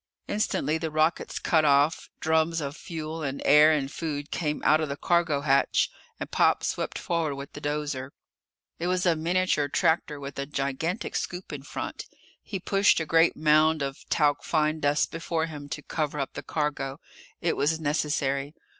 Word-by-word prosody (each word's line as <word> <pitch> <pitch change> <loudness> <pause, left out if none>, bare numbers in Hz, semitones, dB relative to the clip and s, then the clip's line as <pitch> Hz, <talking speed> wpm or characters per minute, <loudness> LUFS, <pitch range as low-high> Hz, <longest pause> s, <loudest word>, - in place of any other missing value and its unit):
Instantly 160 -7 0
the 160 - -2
rockets 155 +2 0
cut 160 -2 +2
off, 145 +2 +3
drums 160 +1 +2
of 145 -1 -4
fuel 160 -1 -6
and 140 -2 -3
air 150 +2 +7
and 140 -3 0
food 145 -3 -4
came 150 -3 -1
out 155 +1 +5
of 155 - -2
the 140 - -4
cargo 165 -4 +1
hatch 140 -1 +2 0.3
and - - -6
Pop - - +3
swept - - -2
forward 165 -4 -1
with 140 0 -8
the - - -8
dozer. 145 -3 -3 0.7
It 175 - -1
was 185 0 +1
a 170 -2 +4
miniature 170 -2 +1
tractor 150 0 +1
with 140 0 -7
a 140 - -3
gigantic 150 - -2
scoop 180 -2 -4
in 145 - -5
front. 140 - -6 0.3
He 195 - -5
pushed 195 +1 +3
a 160 - -2
great 165 +2 +3
mound 155 0 +4
of 135 0 -6
talc 145 -2 +2
fine 155 -1 +1
dust 145 0 +1
before 165 0 -2
him 145 -3 -8
to 145 - -5
cover 150 -2 -2
up 135 - -3
the - - -6
cargo. 145 -2 -2 0.4
It 170 - 0
was 155 +3 +1
necessary. 145 -1 -1
155 Hz, 175 wpm, -27 LUFS, 145-165 Hz, 0.7 s, air